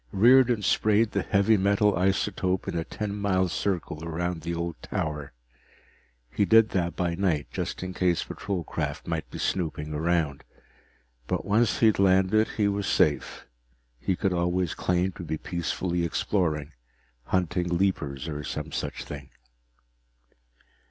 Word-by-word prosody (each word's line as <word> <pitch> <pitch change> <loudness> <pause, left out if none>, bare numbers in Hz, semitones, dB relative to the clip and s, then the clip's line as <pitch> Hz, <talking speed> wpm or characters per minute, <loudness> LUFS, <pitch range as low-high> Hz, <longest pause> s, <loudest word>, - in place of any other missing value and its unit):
Riordan 120 +1 +5
sprayed 105 +3 +3
the - - 0
heavy 100 +1 +3
metal 100 +1 +3
isotope 95 0 0
in - - -3
a 85 - 0
ten 105 +3 -4
mile 95 -2 +1
circle 85 -3 -2
around 85 +1 -3
the 85 +2 -3
old 85 0 -4
tower. 75 -2 -3 1.0
He - - +1
did 110 +1 +5
that 85 -2 -1
by 85 -2 0
night, 85 -5 0
just - - -4
in 90 0 -5
case 90 -2 +1
patrol 100 -4 -4
craft - - -4
might 80 -2 -3
be - - -7
snooping 75 -4 -2
around. 80 -2 0 0.8
But - - -2
once 105 +3 +2
he - - +6
had 110 -3 +4
landed, 95 +3 +4
he 105 -2 +3
was 100 0 -1
safe - - +1 0.5
he 95 +9 0
could 95 +1 0
always 90 -1 0
claim 90 +1 0
to 90 - -9
be 80 -1 -3
peacefully 85 +1 -2
exploring, 80 -3 -1 0.5
hunting 90 -1 0
leapers 85 -6 -1
or 75 -2 -4
some - - -5
such - - -4
thing. 70 -1 -8
90 Hz, 145 wpm, -27 LUFS, 85-100 Hz, 1.0 s, he